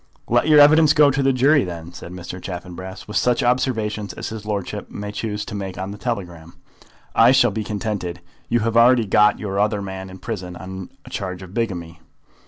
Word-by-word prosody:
"Let 120 +5 +2
your 150 -1 +7
evidence 150 +1 +7
go 150 -2 +6
to 135 +1 0
the 135 0 +3
jury, 135 +3 +4
then," 85 -1 -7
said 85 0 -9
Mr. 90 0 -8
Chaffanbrass, 90 +1 -7
"with 105 - -2
such 125 +1 +2
observations 110 -4 0
as - - -5
his 110 -1 -8
lordship 100 -3 -4
may 105 0 -6
choose 105 -1 -4
to - - -8
make 95 -2 -5
on 95 +1 -4
the 105 - -9
telegram. 90 -9 -5 0.6
I 115 +2 +6
shall 130 -3 +4
be 110 +2 -3
contented. 100 -4 -4 0.3
You 120 0 +2
have 115 +1 -1
already 120 0 +6
got 105 +1 +4
your 100 -2 -3
other 105 0 +1
man 95 -1 -6
in 95 - -10
prison 95 -5 -6
on 95 +1 -8 0.2
a - - -12
charge 95 -1 -4
of 95 0 -12
bigamy." 85 -8 -3
105 Hz, 200 wpm, -21 LUFS, 95-120 Hz, 0.6 s, your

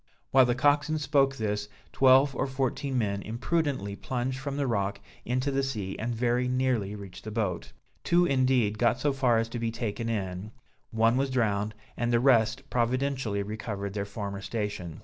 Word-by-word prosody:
While 130 -2 +6
the 120 - +1
coxswain 145 +3 +2
spoke 140 -2 +2
this, 105 -3 -2 0.2
twelve 135 +1 +5
or - - 0
fourteen 135 0 -1
men 100 -4 0
imprudently 120 - -1
plunged 130 +3 -3
from 140 0 -4
the 145 - 0
rock 100 -4 -1 0.3
into 130 +3 0
the 135 0 +1
sea, 105 -8 -3
and 115 +1 -2
very 120 +2 +1
nearly 125 -5 0
reached 100 -3 -10
the 110 - -6
boat. 105 -5 -2 0.3
Two 175 +1 +4
indeed, 130 -7 +2
got 120 +1 +3
so 145 +2 +1
far 130 -4 +3
as 115 0 +1
to 120 - -4
be 115 0 -1
taken 115 -1 -3
in, 100 -1 -3 0.4
one 115 +2 +2
was 135 0 +1
drowned 105 -4 0 0.2
and 120 0 -1
the 120 - +4
rest 120 0 +3
providentially 125 -3 0
recovered 100 -1 -5
their 100 -1 -2
former 100 -1 -5
station. 105 -7 -4
120 Hz, 175 wpm, -28 LUFS, 105-130 Hz, 0.4 s, While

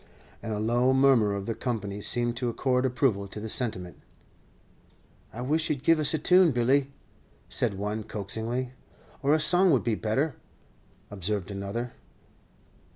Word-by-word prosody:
And 115 - -5
a 105 - -2
low 120 +4 +2
murmur 130 -6 +4
of 100 -1 -4
the 115 - -2
company 105 -5 -4
seemed 120 +2 +1
to 125 - -1
accord 125 +2 +1
approval 120 -6 0
to 100 - -8
the 110 - -5
sentiment. 100 -7 -2 1.3
"I 120 - -7
wish 155 +5 0
you 150 - +2
'd 135 - -13
give 165 -1 +4
us 150 - +3
a - - +1
tune, 180 +3 +5
Billy," 130 +3 +2 0.6
said 100 - 0
one, 105 +2 -3
coaxingly. 110 +5 -3 0.5
"Or 145 +2 +3
a - - +1
song 180 +4 +3
would 135 -7 +3
be 115 - 0
better," 130 +8 -1 0.8
observed 100 0 -3
another. 100 +5 -4
120 Hz, 155 wpm, -27 LUFS, 105-135 Hz, 1.3 s, tune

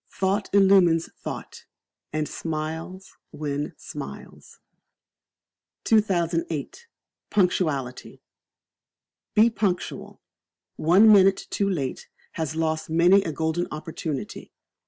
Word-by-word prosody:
Thought 195 +1 -1
illumines 190 -4 +4
thought, - - -7 0.5
and 155 0 -2
smiles 160 +4 -6
win 145 -1 -4
smiles. 70 0 -10 1.2
2008. 175 - 0 0.4
Punctuality. 155 -10 -1 1.1
Be 225 +2 +5
Punctual. 195 -5 -3 0.6
One 195 +7 +6
minute 195 -1 +4
too 200 -1 0
late 140 -9 -3 0.2
has 160 -1 -4
lost 160 -1 -1
many 175 +5 +5
a 170 - -3
golden 160 +3 -1
opportunity. 155 -2 -6
170 Hz, 85 wpm, -25 LUFS, 155-195 Hz, 1.2 s, One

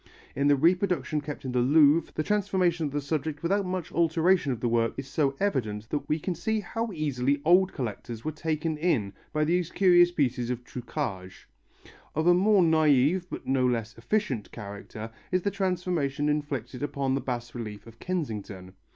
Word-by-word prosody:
In 140 +1 +1
the 145 - +6
reproduction 170 0 +1
kept 145 -1 -7
in 130 - -2
the 125 - +1
Louvre 150 +4 +4
the 155 - 0
transformation 180 -4 +1
of - - -6
the 145 +1 -2
subject 150 +1 -3
without 195 +3 +1
much 180 -2 -3
alteration 165 -1 +2
of 120 - -3
the 120 - -1
work 115 0 +1
is 135 0 -5
so 140 -1 0
evident 110 - -1
that 150 - -3
we 155 - +2
can 175 +3 -3
see 220 +6 -1
how 225 +2 -3
easily 145 -4 0
old 185 +3 +5
collectors 115 -2 -5
were 155 - -1
taken 155 0 -2
in 125 - +1 0.2
by 155 - +1
these 175 +1 +1
curious 175 -2 +5
pieces 125 -7 0
of 125 -1 -3
truquage. 115 -8 -6 0.7
Of 155 +2 0
a 175 - +7
more 195 +1 +4
naive, 160 +2 +3
but - - -7
no 130 -1 +1
less 115 -3 -2
efficient 130 - -2
character 105 +1 -8 0.2
is 185 -1 +1
the 200 - 0
transformation 175 -7 -1
inflicted 140 -4 -3
upon 140 -2 -1
the 135 - 0
bas 120 -2 -4
relief 105 -4 -7
of 115 0 -15
Kensington. 105 - -4
150 Hz, 180 wpm, -27 LUFS, 125-175 Hz, 0.7 s, a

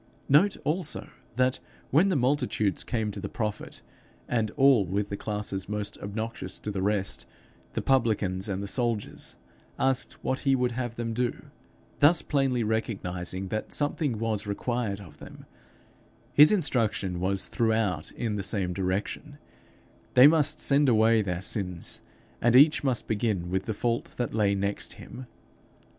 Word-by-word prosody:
Note 185 +8 +4
also, 160 +1 -2 0.3
that, 130 +1 +2 0.3
when 165 +8 +4
the 185 - +1
multitudes 125 -6 0
came 110 -3 -2
to - - -6
the - - -5
prophet, 105 -2 -4 0.4
and 115 -3 0
all, 135 -6 +6
with 100 +3 -2
the 100 - -3
classes 105 -2 -4
most 105 -1 -3
obnoxious 100 -2 -5
to 105 - -5
the 95 -2 -3
rest, 100 -1 0 0.5
the - - -2
publicans 110 -7 +1
and 100 0 -2
the - - -4
soldiers, 115 -1 -2 0.4
asked 135 -1 0
what 130 - -1
he 135 -1 +2
would 125 -1 0
have 120 -1 -4
them 115 -1 -3
do 120 +1 -3 0.5
thus 155 +3 +5
plainly 135 -4 +1
recognizing 95 -4 -3
that 110 +2 -4
something 145 -4 0
was 110 -2 -2
required 105 -1 -2
of 95 -6 -13
them - - -12 0.9
his 150 +1 +8
instruction 115 - +1
was 95 +1 -1
throughout 110 -4 0
in 110 -3 -3
the - - -2
same 95 -2 -1
direction: 100 - -3 0.8
they 125 - +9
must 150 -1 +5
send 140 0 +4
away 110 -1 +4
their 90 -2 -3
sins; 90 -3 -2 0.4
and 120 +1 +3
each 150 +4 +6
must 130 -4 0
begin 105 -5 -1
with 95 +1 -1
the 110 - -1
fault 120 +2 -2
that 120 -2 -2
lay 105 -2 +2
next 100 +1 -2
him. 125 +2 -10
110 Hz, 150 wpm, -27 LUFS, 100-130 Hz, 0.9 s, they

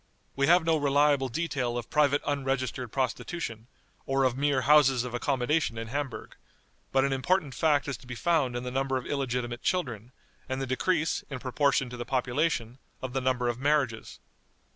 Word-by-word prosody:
We 135 0 +2
have 175 0 +5
no 165 -1 +3
reliable 145 -1 +3
detail 125 -4 -2
of 120 - -6
private 145 -1 +3
unregistered 130 -4 -2
prostitution, 130 -3 -3 0.4
or 135 0 +2
of 130 -2 +2
mere 140 -1 +1
houses 135 -2 +5
of 125 -1 -6
accommodation 130 +1 0
in 115 0 -5
Hamburg; 140 -1 -5 0.5
but 135 0 +3
an 140 - 0
important 145 +2 0
fact 145 +1 +2
is 140 -3 -3
to 125 - -17
be 125 - -6
found 150 -4 +1
in 120 - -3
the 125 - -4
number 135 0 0
of 130 - -5
illegitimate 125 -3 -2
children, 125 - -2 0.4
and 130 0 -2
the 135 - -2
decrease, 160 +5 0
in 135 - -4
proportion 135 +1 +1
to 125 - -6
the 120 - -3
population, 130 -1 -1 0.2
of 130 -1 -6
the 135 - 0
number 125 -1 +1
of 120 0 -2
marriages. 140 -5 0
135 Hz, 180 wpm, -28 LUFS, 125-145 Hz, 0.5 s, have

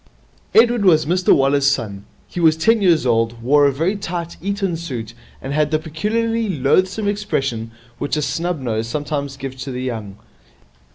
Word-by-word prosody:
Edward 235 -1 +5
was 160 -5 +5
Mr 180 +4 +2
Waller's 140 0 +3
son. 110 -8 -1 0.2
He - - -6
was 160 -2 +4
ten 225 +6 +3
years 170 -7 +3
old, 115 -1 +1
wore 145 +3 +5
a - - +2
very 165 +9 0
tight 170 -4 -5
Eton 195 -1 -1
suit, 125 -10 -6 0.3
and 135 +1 -5
had 150 0 +2
the 155 - +2
peculiarly 220 +8 -1
loathsome 185 +7 +1
expression 135 - -2 0.3
which 145 - -1
a 150 - 0
snub 165 +4 -2
nose 115 -3 -2
sometimes 140 +1 -3
gives 135 -1 -7
to 135 - -6
the 125 0 -4
young. 110 -6 -5
150 Hz, 170 wpm, -20 LUFS, 130-185 Hz, 0.3 s, Edward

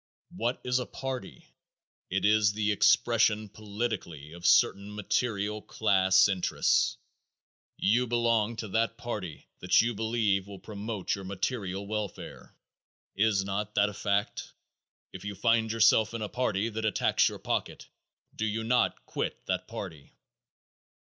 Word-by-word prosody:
What 120 +3 -1
is 125 0 +1
a 125 - -4
party? 130 -7 -6 0.6
It 95 +2 0
is 105 -1 +4
the 105 0 0
expression 110 0 +3
politically 105 -8 -5
of 85 0 -3
certain 100 +1 +3
material 105 0 -1
class 95 -4 +3
interests. 95 -3 +1 0.8
You 120 +4 +2
belong 115 -1 +1
to 110 - -5
that 115 +3 0
party 105 -10 -6
that - - +3
you 120 +1 +2
believe 110 -3 0
will 100 -1 -9
promote 105 -1 -4
your 100 - -4
material 100 0 -3
welfare. 105 -1 -6 0.6
Is 100 -1 +2
not 100 +2 -3
that 100 +1 +3
a - - -8
fact? 100 0 -2 0.6
If 95 - -9
you 105 0 -5
find 115 0 +2
yourself 115 0 +4
in 115 - -3
a - - -2
party 110 -4 0
that 110 0 -5
attacks 110 - +2
your - - -8
pocket - - -3 0.5
do 110 - -1
you 110 +1 -2
not 125 +2 +1
quit - - -4
that - - -2
party? - - -8
105 Hz, 140 wpm, -29 LUFS, 100-115 Hz, 0.8 s, is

